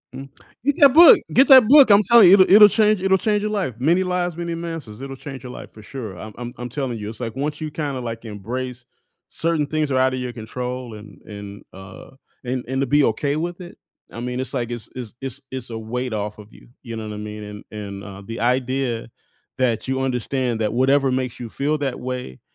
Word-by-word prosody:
Mm, 135 +1 -9 0.4
get 285 0 +2
that 280 - +9
book, 325 +5 +8
get 265 +3 +6
that 260 -4 +9
book. 275 0 +8
I'm 205 +1 +6
telling 230 0 +7
you, 180 - +8
it'll 190 -2 +6
it'll 210 +1 +10
change 215 -2 +2
it'll 190 0 +3
change 210 +1 0
your 210 - -2
life. 190 - -2
Many 170 +8 +2
Lives, 180 -2 -2
Many 170 0 -4
Masters, 165 -10 -7
it'll 135 0 -7
change 135 -1 -9
your 125 - -8
life - - -10
for 110 - -13
sure. 110 -4 -8
I'm 110 +2 -9
I'm 120 0 -7
I'm 125 0 -6
telling 130 -2 -3
you, 105 -1 -6
it's 110 +2 -9
like 115 -1 -5
once 150 +3 -3
you 155 -1 -4
kinda, 145 -4 -4
like, 115 -1 -6
embrace 120 +4 -6 0.4
certain 165 -2 -1
things 155 0 -1
are 130 - 0
outta 130 0 +2
your 125 -1 -5
control 125 +1 -6
and 105 0 -13
and, 100 -1 -10
uh 95 +1 -12 0.3
and 125 0 -3
and 130 +1 -2
to 135 - 0
be 145 +2 +3
okay 140 +6 -1
with 175 +3 -4
it, 175 0 -11 0.3
I 115 - -8
mean, 125 +1 -3
it's 130 - -6
like 120 -3 -2
it's 120 -2 -6
it's 120 -4 -8
it's 135 +1 -6
it's 130 -2 -7
a 115 - -5
weight 125 +3 -4
off 105 0 -4
of 105 +1 -13
you, - - -18 0.2
you 115 -3 -7
know 110 -1 -6
what 105 - -6
I - - -7
mean? 105 0 -7
And 105 0 -9
and, 100 -2 -7
uh, 100 -1 -10
the 115 +2 -6
idea 125 -1 -1 0.5
that 120 -3 0
you 130 0 -1
understand 125 -2 -2
that 110 -1 -1
whatever 135 +2 +3
makes 130 -2 -3
you 120 - -6
feel 145 +6 -1
that 140 -4 -3
way 125 - -6
130 Hz, 235 wpm, -21 LUFS, 115-155 Hz, 0.5 s, it'll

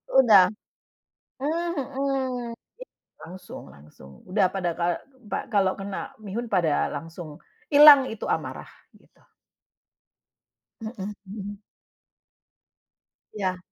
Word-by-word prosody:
Udah. 215 -8 +7 0.9
Mmm, 335 +5 -1 0.2
mhm 260 -3 -2
i 230 - -15 0.5
langsung 185 +3 -10
langsung. 70 -2 -16
Udah 195 0 +3
pada 180 -3 -1
ka 175 0 -1 0.3
pa - - -4
kalau 195 -2 +3
kena 195 0 -6
mihun, 215 +4 -4
pada 175 -8 +1
langsung 160 +1 -8 0.3
ilang 285 -2 +10
itu 225 -3 -7
amarah, - - -3 0.3
gitu. - - -26 1.6
Heeh, 210 -2 -6
hmm. 205 +1 -7 1.8
Iya. 185 -3 -2
200 Hz, 95 wpm, -25 LUFS, 180-245 Hz, 1.8 s, ilang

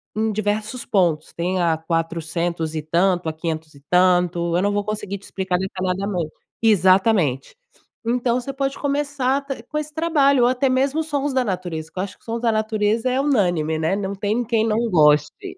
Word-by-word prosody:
em 220 0 0
diversos 215 +3 -2
pontos. 170 -6 +1
Tem 180 +2 -1
a 165 -2 +2
400 165 0 -2
e 155 - -1
tanto, 175 +2 +1
a - - -4
500 160 -1 -4
e 140 - -16
tanto. 175 -1 +3
Eu 180 - +2
não 205 - +1
vou 205 - 0
conseguir 205 -1 -4
te 195 - -20
explicar 190 -2 -2
detalhadamente 185 -2 -2 0.3
exatamente. 190 - +3 0.5
Então 240 +1 +1
você 275 - -5
pode 270 0 -2
começar 280 -2 0
até 275 -4 -5
com 295 +5 -5
esse 300 0 -4
trabalho 285 -5 +3
ou 245 - +5
até 260 +2 +1
mesmo 270 +4 +1
sons 290 -2 -2
da 260 -1 +1
natureza 175 -5 -4
que - - -22
eu - - +1
acho 200 - -8
que - - -29
sons 230 0 -3
da 235 -2 +2
natureza 215 +2 0
é 255 +1 0
unânime, 175 - +1
né? 160 +4 +1
Não 200 -1 -3
tem 210 +5 -1
quem 225 -1 +1
não 215 - +1
goste. 150 -2 +3
200 Hz, 190 wpm, -22 LUFS, 170-245 Hz, 0.5 s, ou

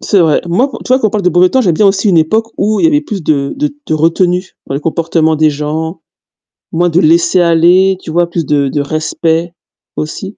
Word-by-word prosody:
C'est 200 - +1
vrai. 160 -3 +2
Moi, 240 +11 0
tu - - -9
vois 255 +1 +3
qu'on 215 - +1
parle 205 -2 -3
de - - +4
beau 175 +2 +4
temps, 260 - +1
j'aime 180 -9 +1
bien 210 - +3
aussi 195 +2 +1
une 175 -4 +3
époque 220 +9 0
où 210 +1 0
il - - 0
y - - +7
avait 295 -2 +2
plus 210 - -6
de 140 -3 -1
de 295 +1 -1 0.2
de 155 - -1
retenue 175 +3 0
dans 135 - -5
les 140 - -2
comportements 165 0 0
des 155 0 +3
gens, 155 +3 -4 0.7
moins 175 +2 +1
de 170 +2 +2
laisser-aller, 170 +3 +3
tu 160 - -8
vois, 170 +1 0
plus 170 -2 -3
de 140 -2 0
de 145 +1 -2
respect 160 +3 -2 0.4
aussi. 190 +7 -6
170 Hz, 225 wpm, -12 LUFS, 160-195 Hz, 0.7 s, y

